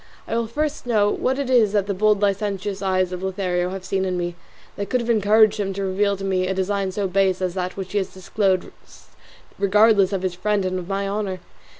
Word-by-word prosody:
I - - -2
will 230 -1 0
first 295 +2 -3
know 210 -3 +3
what 260 +1 0
it 280 -2 -2
is 235 -5 +3
that 205 -2 +2
the 200 - -2
bold 210 +1 +2
licentious 200 -1 -1
eyes 185 -1 +1
of 180 0 -5
Lothario 185 -2 -1
have 190 0 -6
seen 190 -1 -1
in 185 -1 -1
me 175 0 -2 0.4
that 200 - -4
could 250 - +1
have 235 0 0
encouraged 215 0 +4
him 195 -1 -1
to 195 +1 -3
reveal 200 +1 +1
to 195 - -8
me 185 -1 0
a 190 - -1
design 190 0 -1
so 195 +1 -1
base 190 0 +1
as 185 -2 -1
that 185 0 -4
which 190 -1 -5
he 205 - +1
has 190 -1 -4
disclosed 190 0 -1 0.9
regardless 200 0 +4
of 190 -2 -2
his 185 -2 -1
friend 205 +2 0
and 185 0 -1
of 175 - -8
my 195 0 -2
honour. 195 -2 -3
195 Hz, 230 wpm, -22 LUFS, 185-210 Hz, 0.9 s, encouraged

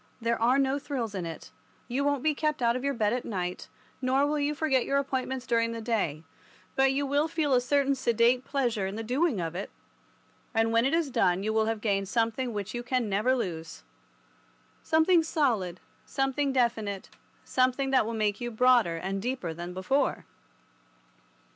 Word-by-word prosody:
There 230 -1 -1
are 245 +3 +4
no 275 +1 +1
thrills 260 -7 -4
in 180 -4 -3
it. 165 - -9 0.4
You 260 +3 -1
won't 285 -2 0
be 310 -1 +3
kept 305 -2 -1
out 235 0 +3
of 255 - -3
your 280 -1 0
bed 215 -1 +1
at 250 - -2
night, 180 -4 -4 0.3
nor 265 +2 +2
will 295 +1 0
you 290 +1 0
forget 270 -5 +2
your 275 - 0
appointments 265 -2 -2
during 230 -1 +1
the 230 - -5
day, 210 -10 -1 0.5
but 270 0 +4
you 280 +1 0
will 285 +3 +1
feel 310 -4 0
a 250 - +4
certain 280 +2 +2
sedate 240 -1 +2
pleasure 240 -9 -1
in 195 - -5
the 225 - -4
doing 255 - +1
of 165 -1 -3
it, 190 +3 -5 0.9
and 225 0 +2
when 230 +2 +3
it 280 - +1
is 325 -5 0
done 190 -6 +2
you 215 +1 -1
will 220 0 +2
have 225 -1 -2
gained 195 -3 0
something 230 +2 0
which 205 -1 -4
you 240 - -3
can 245 -2 -1
never 215 +6 +2
lose—something 60 - -2
solid, 230 - 0 0.2
something 270 +1 -1
definite, 230 -6 -1 0.4
something 260 +1 +1
that 265 - +4
will 230 +1 -4
make 210 0 0
you 240 - -2
broader 240 -6 +3
and 195 +3 -3
deeper 240 -8 -3
than 175 +2 -6
before. 190 +10 0
240 Hz, 185 wpm, -28 LUFS, 205-270 Hz, 0.9 s, are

